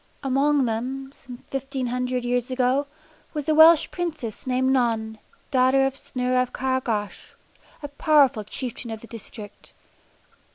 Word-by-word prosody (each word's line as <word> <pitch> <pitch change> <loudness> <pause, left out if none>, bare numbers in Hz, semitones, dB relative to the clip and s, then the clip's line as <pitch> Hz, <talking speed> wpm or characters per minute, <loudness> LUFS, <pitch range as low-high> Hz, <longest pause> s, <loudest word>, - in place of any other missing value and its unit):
Among 275 +1 +2
them, 260 +4 -3
some 250 -3 -13
fifteen 270 -1 -3
hundred 250 0 -2
years 245 0 0
ago, 260 +2 +1 0.5
was 295 -2 -3
a 310 - +3
Welsh 315 0 +7
Princess 305 - -5
named 260 +1 +1
Non, 225 -4 0 0.3
daughter 265 0 +4
of 270 0 -1
Cynyr 255 -1 -2
of 250 - -3
Caer 260 0 -1
Gawch, 210 -5 -4 0.5
a - - -3
powerful 285 -5 +3
chieftain 240 +3 -6
of 220 -1 -6
the - - -11
district. 215 -2 -10
255 Hz, 140 wpm, -24 LUFS, 240-270 Hz, 0.5 s, Welsh